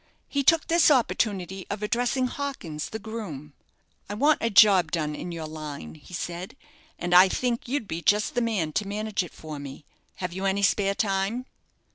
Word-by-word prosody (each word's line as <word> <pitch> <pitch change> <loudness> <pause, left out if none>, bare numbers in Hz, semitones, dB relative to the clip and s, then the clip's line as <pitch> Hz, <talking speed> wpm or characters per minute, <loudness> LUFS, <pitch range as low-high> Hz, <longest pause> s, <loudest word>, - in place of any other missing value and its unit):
He 280 - 0
took 320 +3 +4
this 335 -1 +4
opportunity 195 - 0
of 205 +1 -4
addressing 245 +4 +1
Hawkins, 245 - -4
the 220 - -4
groom. 200 -10 -7 0.6
"I 205 - -3
want 295 +7 +3
a 230 - +1
job 195 -6 +6
done 155 -3 -1
in 175 - -6
your 165 -2 -5
line," 155 -2 -7
he 160 +3 -11
said, 175 +5 -5 0.4
"and 175 0 -2
I 185 +2 +8
think 240 +3 -1
you'd 255 -3 -2
be 165 -1 -4
just 210 +4 +2
the 245 - +1
man 200 -10 -1
to 205 - -1
manage 210 +1 -2
it 180 - -7
for 155 -2 -8
me. 140 +1 -9 0.3
Have 180 -2 -4
you 190 +2 -4
any 195 +1 +1
spare 200 -1 +2
time?" 200 +5 -1
195 Hz, 185 wpm, -26 LUFS, 170-230 Hz, 0.6 s, I